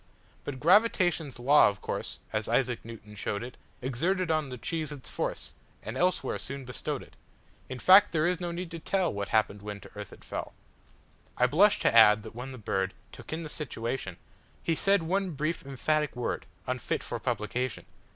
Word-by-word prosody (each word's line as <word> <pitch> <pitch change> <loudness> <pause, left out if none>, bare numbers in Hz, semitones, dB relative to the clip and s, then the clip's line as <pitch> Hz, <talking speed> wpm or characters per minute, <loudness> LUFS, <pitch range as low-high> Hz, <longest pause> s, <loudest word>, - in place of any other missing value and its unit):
But 135 -2 -5
gravitation's 175 - +3
law, 140 +3 +6
of 100 -2 -6
course, - - -4 0.2
As - - -1
Isaac 125 -3 +1
Newton 110 -2 -10
showed 100 +1 -3
it, 125 +1 -8 0.3
Exerted 170 +8 0
on 155 -3 +1
the 125 - -6
cheese 155 +3 -3
its 145 -3 -8
force, - - -3 0.3
And 110 - -5
elsewhere 180 +7 +1
soon 140 -1 -5
bestowed 125 -3 -4
it.In 130 - -14
fact, 190 +9 +7
there 155 -1 +2
is 180 -1 +1
no 175 - -2
need 175 0 -5
to 165 - -5
tellWhat 165 - 0
happened 105 -2 +1
when 105 0 -6
to - - -13
earth - - -7
it - - -14
fell.I 125 - -6
blush 190 +11 +5
to - - +3
add 105 -2 +8
that - - -9
when 125 +3 -6
the 130 - -8
birdTook 95 -3 -4
in 160 +1 -3
the - - -5
situationHe 120 - -3 0.6
said 195 +1 +3
one 190 +3 0
brief, 155 +4 -2
emphatic 150 +2 0
word, 125 - -3 0.2
Unfit - - -2
for - - -4
publication. 125 -2 -2
140 Hz, 170 wpm, -29 LUFS, 115-170 Hz, 0.6 s, add